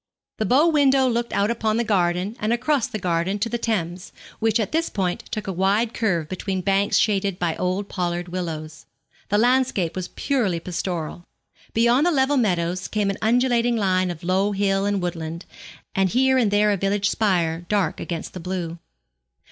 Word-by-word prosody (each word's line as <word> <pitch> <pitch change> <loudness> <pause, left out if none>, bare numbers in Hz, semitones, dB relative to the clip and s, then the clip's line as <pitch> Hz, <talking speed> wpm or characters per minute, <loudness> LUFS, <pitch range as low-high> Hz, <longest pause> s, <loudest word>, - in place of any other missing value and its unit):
The 220 - 0
bow 280 +7 +4
window 275 -4 +4
looked 235 -1 -1
out 205 +3 +1
upon 220 -1 0
the 235 - +1
garden 185 -1 0
and 215 +1 -1
across 250 +2 +1
the 245 -4 -4
garden 180 +1 -1
to 230 +3 -1
the 240 +1 -2
Thames, 180 -5 -2 0.3
which 225 0 +2
at 215 - -1
this 325 +1 0
point 185 -3 -2
took 215 -3 -4
a 195 - -3
wide 200 +6 +1
curve 175 -9 0
between 185 +2 -3
banks 195 +3 +2
shaded 200 -3 +1
by 170 -3 -1
old 185 +2 -1
pollard 175 -2 -2
willows. 160 -3 -5 0.4
The 205 - +2
landscape 245 -7 +2
was 185 -1 -3
purely 225 - -1
pastoral. 175 -1 -4 0.5
Beyond 240 +7 +4
the - - +3
level 280 -1 +2
meadows 180 -5 0
came 205 -2 0
an 195 - -7
undulating 240 +1 +2
line 185 -3 +1
of 170 -1 -6
low 190 +3 +1
hill 195 0 +1
and 200 -2 0
woodland, 165 -1 -4 0.5
with 190 -1 +1
here 260 +1 +4
and 225 -4 +2
there 210 +1 +3
a 200 - +1
village 200 +1 0
spire 175 -6 +1
dark 205 -2 0
against 170 -2 -5
the 185 - -6
blue. 175 -1 -4
200 Hz, 180 wpm, -23 LUFS, 180-230 Hz, 0.5 s, bow